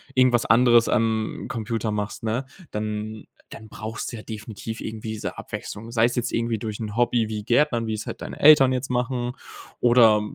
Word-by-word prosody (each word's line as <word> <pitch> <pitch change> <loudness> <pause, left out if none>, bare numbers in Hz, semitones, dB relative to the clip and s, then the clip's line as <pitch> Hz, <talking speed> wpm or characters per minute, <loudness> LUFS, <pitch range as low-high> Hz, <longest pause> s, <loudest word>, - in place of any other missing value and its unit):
irgendwas 125 -2 +4
anderes 120 0 +5
am 110 -1 0
Computer 115 -1 -2
machst, 105 0 -4
ne, 115 +4 -1 0.3
dann 105 0 -4 0.3
dann 110 - -10
brauchst 110 +1 -6
du - - -6
ja - - -8
definitiv 110 +1 -7
irgendwie 110 0 -6
diese 110 - -5
Abwechslung. 115 +3 -7
Sei 115 -1 +3
es 120 - 0
jetzt 120 -2 -1
irgendwie 115 -1 -1
durch 110 -1 -5
'n 105 -2 -5
Hobby 120 -2 +2
wie 105 -1 -4
Gärtnern, 120 0 +2
wie 110 - -1
es 110 - -6
halt - - -7
deine - - -7
Eltern 145 -3 +7
jetzt 130 +1 -2
machen 125 0 -1 0.5
oder 115 -3 +5
115 Hz, 185 wpm, -24 LUFS, 110-120 Hz, 0.5 s, Eltern